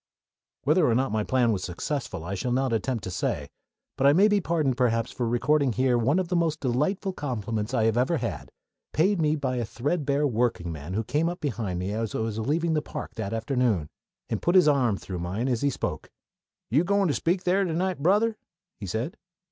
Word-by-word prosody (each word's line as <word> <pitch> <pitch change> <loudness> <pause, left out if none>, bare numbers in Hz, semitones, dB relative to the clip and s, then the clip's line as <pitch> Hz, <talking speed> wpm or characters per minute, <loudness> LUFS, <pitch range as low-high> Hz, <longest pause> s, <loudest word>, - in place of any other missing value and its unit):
Whether 155 +1 +3
or 115 - +3
not 130 0 +1
my 110 0 0
plan 125 0 +2
was 95 -4 -1
successful 95 - -4
I 95 - -4
shall 110 +6 -2
not 130 0 +1
attempt 115 +1 -1
to 95 - -4
say; 75 -4 -2 0.5
but 135 - +4
I 140 - +7
may 195 +6 +6
be 205 -1 +2
pardoned, 155 -6 +1
perhaps, 115 -3 +1
for 120 - -2
recording 135 +2 +2
here 130 +1 +2
one 125 +7 +2
of 185 -2 0
the 180 - -1
most 165 -2 +1
delightful 150 +10 0
compliments 115 - -3
I 125 -4 +1
have 115 +1 +2
ever 130 +7 +2
had, - - -4 0.4
paid 185 +3 +2
me 155 0 +2
by 130 -4 -2
a 120 - 0
threadbare 140 +5 0
workingman 90 - -1
who 110 - 0
came 150 +8 0
up 175 - -5
behind 110 - -2
me 90 +3 -2
as 110 0 -3
I - - -1
was 110 -1 -2
leaving 160 +8 0
the 155 - +1
park - - -7
that 110 -4 -4
afternoon, 115 - 0 0.4
and - - -2
put 175 - +1
his 180 -4 +7
arm 130 -8 +3
through 90 -2 -6
mine 95 +8 -2
as 120 -3 0
he 140 - +3
spoke. 135 - -4 0.6
"Are - - -1
you 160 - +5
goin' 200 +1 +2
to 150 - +1
speak 175 +5 0
here 190 +2 +3
to 180 - -1
night, 180 +1 -1
Brother?" 210 +7 +3 0.4
he 100 - -6
said. 120 - -3
130 Hz, 220 wpm, -26 LUFS, 110-160 Hz, 0.6 s, I